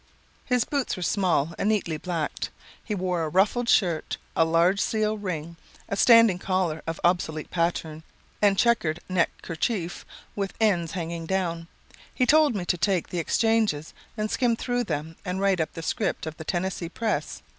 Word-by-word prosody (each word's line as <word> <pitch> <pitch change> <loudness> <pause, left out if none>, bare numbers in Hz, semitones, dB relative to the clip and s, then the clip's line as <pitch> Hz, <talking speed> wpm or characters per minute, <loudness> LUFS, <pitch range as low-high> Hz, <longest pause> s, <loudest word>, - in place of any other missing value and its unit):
His 250 -2 +2
boots 280 -3 -1
were 180 - -4
small 170 -5 +1
and 205 - +1
neatly 180 -7 0
blacked. 165 -2 -3 0.3
He 210 - -3
wore 180 -3 -1
a 155 - -2
ruffled 210 +8 +2
shirt, 175 -9 +2 0.2
a - - +5
large 170 +4 +3
seal 215 -1 0
ring, 170 -5 -5 0.3
a - - -2
standing 230 -3 +6
collar 180 -5 -1
of 165 0 -3
obsolete 165 -3 0
pattern, 165 -2 -1 0.4
and 200 -2 +4
checkered 175 -10 +2
neck 185 -2 +2
kerchief 175 +1 -2 0.3
with 200 -1 -3
ends 175 -7 +2
hanging 170 -2 -4
down. 170 -3 -1 0.5
He 255 - +2
told 300 -1 +5
me 185 -3 -2
to 180 -1 0
take 190 -3 +1
the 175 - -2
exchanges 215 -4 +1 0.2
and 215 0 -2
skim 240 -2 +2
through 245 +1 -1
them 155 +3 -4
and 180 +1 -3
write 195 -2 +2
up 160 - -3
the 165 - -7
'Script - - -1
of 160 -1 -6
the 160 - -8
Tennessee 175 -1 -2
Press.' 225 +4 -2
180 Hz, 170 wpm, -26 LUFS, 165-215 Hz, 0.5 s, standing